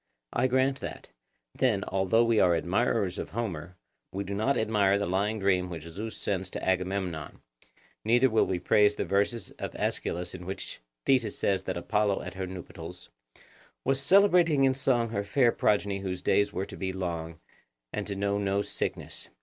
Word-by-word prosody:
I 130 - +2
grant 130 +1 +2
that. 80 -4 -7 0.4
Then, - - +1
although 95 +4 +3
we 115 -2 +3
are 90 -2 +5
admirers 100 +2 0
of - - -4
Homer, 90 -6 -4 0.4
we 100 +1 -3
do 100 +1 -5
not 110 +8 +1
admire 105 -3 +3
the 100 - -1
lying 100 +5 0
dream 95 -3 +1
which 80 -3 -6
Zeus 100 +7 -6
sends 95 -2 -2
to - - -5
Agamemnon; 90 -4 -1 0.6
neither 120 +4 +4
will 110 -3 +2
we 95 - 0
praise 105 +4 +4
the - - -2
verses 100 +3 0
of - - -5
Aeschylus 90 +1 -2
in 90 -1 -8
which 95 - -6 0.3
Thetis 125 -6 +2
says 95 -1 +1
that 95 - -2
Apollo 105 +2 0
at 90 - -6
her 95 -1 -4
nuptials 90 -2 -9 0.7
'Was 135 +1 +1
celebrating 175 -3 +5
in 135 -1 +4
song 130 -3 +1
her 100 -2 -2
fair 120 +4 +3
progeny 100 -3 +1
whose 95 -2 -4
days 100 0 +3
were 95 0 -2
to - - -10
be 95 -1 -2
long, 85 -3 -4 0.5
and - - -3
to 100 - -3
know 100 +1 0
no 100 0 0
sickness. - - -4
100 Hz, 175 wpm, -28 LUFS, 90-115 Hz, 0.7 s, are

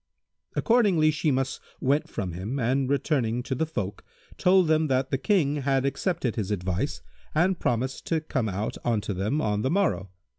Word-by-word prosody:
Accordingly 200 -10 +4
Shimas 135 -4 0 0.2
went 140 +3 +1
from 95 -5 -3
him 95 +10 -4
and 130 +2 +1
returning 125 -5 0
to 130 - -3
the 160 +5 -1
folk, 105 -10 -4 0.3
told 185 -1 +4
them 155 0 +3
that 130 -1 0
the 135 - +2
King 150 -6 +2
had 135 -1 +1
accepted 140 - -1
his 105 -3 -2
advice 95 +5 -2 0.3
and 175 +3 +2
promised 125 +2 -1
to 165 - +1
come 130 -7 -2
out 100 +3 -3
unto 110 -3 0
them 105 +11 -1
on 105 -1 0
the 130 - 0
morrow. 120 - +1
135 Hz, 170 wpm, -26 LUFS, 110-155 Hz, 0.3 s, Accordingly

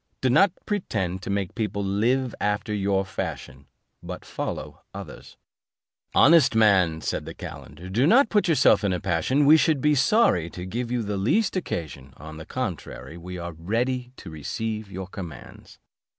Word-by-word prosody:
Do 130 - +1
not 195 +8 +5
pretend 95 - -2
to 110 - -7
make 100 -2 -2
people 105 -3 -2
live 115 +6 +1
after 105 +1 -1
your 100 -1 0
fashion, 70 -7 -6 0.3
but - - -8
follow - - -5
ours." - - -10 0.8
"Honest 160 -5 +6
man," 95 -7 +4
said - - -3
the - - -8
calender, 80 +5 -9
"do 115 +9 +2
not 240 +5 +5
put 210 -3 +2
yourself 145 -8 +4
in 100 -2 +1
a 90 - -1
passion; 95 - +1
we 155 +3 +8
should 155 -2 +2
be 150 +3 +3
sorry 135 - +3
to 90 +1 -8
give 115 +5 -4
you 120 -1 -1
the 100 -1 -3
least 175 - +1
occasion; 75 - -5
on 80 +1 -10
the 80 - -10
contrary, 95 - -5
we 90 +2 -8
are 85 -1 -6
ready 120 +9 -2
to 90 - -10
receive 110 +7 -4
your 95 +1 -5
commands." 90 - -10
105 Hz, 165 wpm, -25 LUFS, 90-130 Hz, 0.8 s, we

